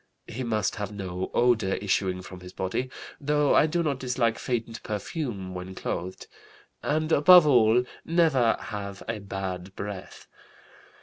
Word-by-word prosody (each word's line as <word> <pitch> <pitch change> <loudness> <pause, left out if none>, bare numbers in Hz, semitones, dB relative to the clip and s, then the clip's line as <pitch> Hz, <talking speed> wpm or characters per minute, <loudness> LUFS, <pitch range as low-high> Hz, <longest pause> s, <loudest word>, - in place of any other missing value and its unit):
He 125 - -6
must 110 -4 -1
have 105 0 -4
no 95 -3 -4
odor 115 -6 +2
issuing 95 -2 -1
from 90 0 -10
his 90 0 -11
body 95 +8 -2 0.3
(though 150 -1 +2
I - - +5
do 170 +2 0
not 140 -4 -1
dislike 120 -3 0
faint 115 -2 -3
perfume 105 - -4
when 90 +1 -7
clothed), 90 +1 -4 0.6
and, 155 +2 0
above 165 +3 +8
all, 120 -4 +5 0.2
never 160 -9 +3
have 100 -2 -6
a 115 -1 -3
bad 95 -1 -5
breath. 100 -2 -7
110 Hz, 140 wpm, -27 LUFS, 95-130 Hz, 0.6 s, above